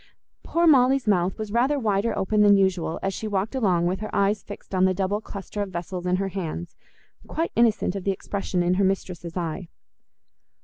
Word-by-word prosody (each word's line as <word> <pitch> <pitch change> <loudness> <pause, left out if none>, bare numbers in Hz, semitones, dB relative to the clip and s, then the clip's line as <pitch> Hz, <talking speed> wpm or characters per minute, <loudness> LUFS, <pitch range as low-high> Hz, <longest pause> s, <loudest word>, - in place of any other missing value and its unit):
Poor 340 +1 +1
Molly's 270 -4 +5
mouth 185 -2 +2
was 215 -1 -5
rather 255 +6 +2
wider 220 -2 0
open 210 +2 +1
than 205 -1 +6
usual, 190 -4 +1
as 195 0 -1
she 220 - -4
walked 205 +2 -1
along 185 -10 +1
with 185 +2 0
her 215 - -5
eyes 200 +1 +2
fixed 205 - -11
on 185 0 +3
the 185 0 +2
double 195 +3 -1
cluster 205 0 -6
of 200 - -3
vessels 180 0 -5
in 180 - +2
her 195 +1 -1
hands, 175 -2 -5 0.5
quite 330 +1 -2
innocent 225 -5 +2
of 195 - -4
the 200 - -1
expression 190 -1 -2
in 175 +1 +2
her 195 +2 +2
mistress's 180 -3 -2
eye. 170 +1 -3
195 Hz, 195 wpm, -25 LUFS, 185-215 Hz, 0.5 s, than